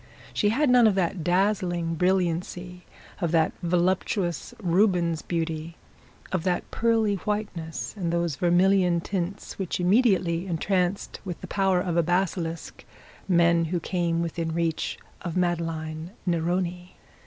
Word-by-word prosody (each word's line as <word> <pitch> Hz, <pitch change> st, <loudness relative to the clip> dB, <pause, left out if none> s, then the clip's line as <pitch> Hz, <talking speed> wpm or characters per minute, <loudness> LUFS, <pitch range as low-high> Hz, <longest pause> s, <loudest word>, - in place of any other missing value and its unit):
She 205 Hz, -, +2 dB
had 285 Hz, +7 st, +2 dB
none 245 Hz, -2 st, +7 dB
of 205 Hz, -, +2 dB
that 180 Hz, -2 st, 0 dB
dazzling 175 Hz, -2 st, +1 dB
brilliancy, 180 Hz, 0 st, -1 dB, 0.3 s
of 170 Hz, -4 st, 0 dB
that 160 Hz, -1 st, +3 dB
voluptuous 175 Hz, 0 st, 0 dB
Rubens 175 Hz, -3 st, +2 dB
beauty, 165 Hz, -1 st, -3 dB, 0.5 s
of 185 Hz, -, 0 dB
that 180 Hz, -1 st, -1 dB
pearly 225 Hz, -3 st, +2 dB
whiteness, 185 Hz, -5 st, -4 dB
and 175 Hz, -5 st, -2 dB
those 170 Hz, -3 st, 0 dB
vermilion 180 Hz, +1 st, +3 dB
tints, 190 Hz, +2 st, -4 dB
which 190 Hz, -2 st, -2 dB
immediately 185 Hz, -3 st, +2 dB
entranced 180 Hz, +2 st, -1 dB
with 180 Hz, -3 st, -5 dB
the -, -, -6 dB
power 190 Hz, -2 st, +2 dB
of 175 Hz, -2 st, -1 dB
a -, -, +6 dB
basilisk 175 Hz, -1 st, -2 dB, 0.4 s
men 170 Hz, -2 st, +4 dB
who 175 Hz, +2 st, -1 dB
came 170 Hz, -1 st, -1 dB
within 165 Hz, -1 st, -3 dB
reach 165 Hz, -2 st, -1 dB, 0.2 s
of 175 Hz, -1 st, -4 dB
Madeline 165 Hz, -2 st, -2 dB, 0.2 s
Neroni. 175 Hz, +1 st, -1 dB
175 Hz, 130 wpm, -26 LUFS, 170-190 Hz, 0.5 s, none